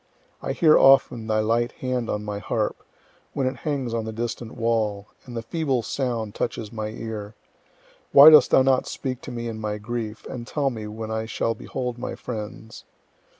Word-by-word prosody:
I - - -2
hear 155 -2 +5
often 125 -4 +5
thy 110 -1 +2
light 115 +2 +1
hand 125 -2 -3
on 105 0 -2
my 105 -1 -4
harp, 105 +1 -2 0.5
when 135 - -1
it 130 0 -1
hangs 135 -4 -3
on 115 -1 -1
the 110 - -4
distant 115 0 -4
wall, 110 -4 0 0.2
and 120 -1 -7
the 115 - -4
feeble 135 -1 -1
sound 115 -3 -2
touches 110 -3 -3
my 110 -1 -3
ear. 110 -1 -6 0.8
Why 145 +3 +10
dost 155 - +8
thou 130 - +5
not 130 -1 +2
speak 130 -2 -4
to - - -8
me 120 -1 -4
in 110 -1 -5
my 105 -1 -3
grief, 110 0 -5
and 120 -2 -7
tell 140 -3 0
me 110 -3 -6
when 110 +1 -6
I 110 0 -2
shall 115 0 -1
behold 125 0 -5
my 125 - -4
friends? 110 -1 -7
115 Hz, 190 wpm, -24 LUFS, 110-125 Hz, 0.8 s, Why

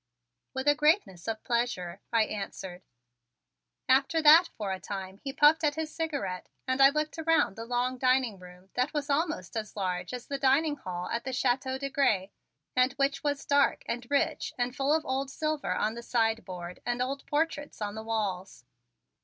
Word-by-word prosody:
"With 265 +2 -3
a 290 - +7
greatness 300 - +1
of 220 -1 -3
pleasure," 235 -7 -1
I 230 -1 +4
answered. 190 -3 -6 1.1
After 275 +5 +3
that 320 +4 +8
for 205 -3 -3
a 190 - -3
time 195 -1 -6
he 275 - -3
puffed 295 +3 +5
at 295 -2 +2
his 315 -1 -4
cigarette 285 - -3 0.2
and 260 +1 +1
I 270 - +9
looked 305 +2 -2
around 325 -10 +2
the 225 - -6
long 250 +1 -1
dining 255 -5 +2
room 180 +1 -15
that 250 +4 -1
was 290 0 -1
almost 295 - -1
as 220 -1 -4
large 180 -3 -2
as 250 -1 -6
the 280 -1 -4
dining 290 +3 +3
hall 180 -7 -5
at 235 - -2
the 260 - -4
Chateau 260 +1 0
de 275 0 -4
Grez 200 -9 +2 0.5
and 255 +1 +3
which 275 +1 0
was 285 -1 -1
dark 285 0 +3
and 240 0 -4
rich 305 +3 0
and 245 +1 -1
full 275 +2 +1
of 315 +1 +2
old 265 +1 -1
silver 305 - -2
on 215 +3 0
the 235 - -7
sideboard 220 -7 -2
and 245 0 -1
old 270 +2 -2
portraits 295 -1 -1
on 205 -1 -3
the 220 - -6
walls. 200 - -3
255 Hz, 185 wpm, -29 LUFS, 210-285 Hz, 1.1 s, I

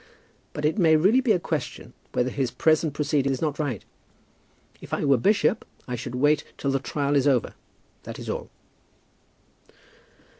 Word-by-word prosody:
But 150 - -3
it 160 +8 +1
may 160 -3 +5
really 195 +11 +4
be 250 -4 +2
a 200 - +4
question - - -4 0.2
whether 125 +1 0
his 135 -2 -1
present 155 +2 +1
proceeding 145 -2 +1
is 130 - -2
not 150 -2 -2
right. 135 -9 -3 1.0
If - - -4
I - - -2
were 140 -1 +5
bishop 205 - +2 0.2
I 125 - -3
should 120 +1 -6
wait 145 +3 +3
till 140 - -1
the 135 - +1
trial 140 +1 -2
was 140 -1 +3
over; 130 -4 +2 0.5
that - - -8
is - - -8
all." - - -4
145 Hz, 165 wpm, -25 LUFS, 135-160 Hz, 1.0 s, may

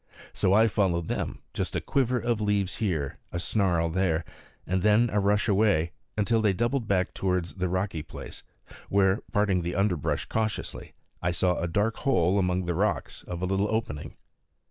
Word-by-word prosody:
So - - +1
I 110 +3 +6
followed 90 -6 0
them, - - -3
just - - -3
a - - +2
quiver 130 -2 +1
of 120 -2 -1
leaves 100 -3 0
here, 80 -10 -2
a - - -3
snarl 85 -3 +1
there, 85 -2 +1 0.4
and 95 +1 0
then 105 +4 +4
a 105 - +2
rush 105 +2 +2
away, 100 -6 +3 0.3
until 110 +2 +2
they 105 -3 +3
doubled 120 +3 0
back 95 -2 +1
towards 90 -2 -1
the 90 -2 -2
rocky 95 -3 -1
place, - - -9 0.5
where, 95 0 +3
parting 100 -3 +2
the 85 +1 -3
underbrush 95 -5 0
cautiously, 110 -1 -3 0.3
I 90 - +1
saw 90 +1 +1
a 85 - -1
dark 105 +6 0
hole 95 -6 +2
among 90 -1 0
the 85 - -1
rocks 100 +6 -1
of 90 0 -5
a - - +2
little 95 +2 +1
opening. 110 -10 -3
95 Hz, 175 wpm, -27 LUFS, 90-105 Hz, 0.5 s, I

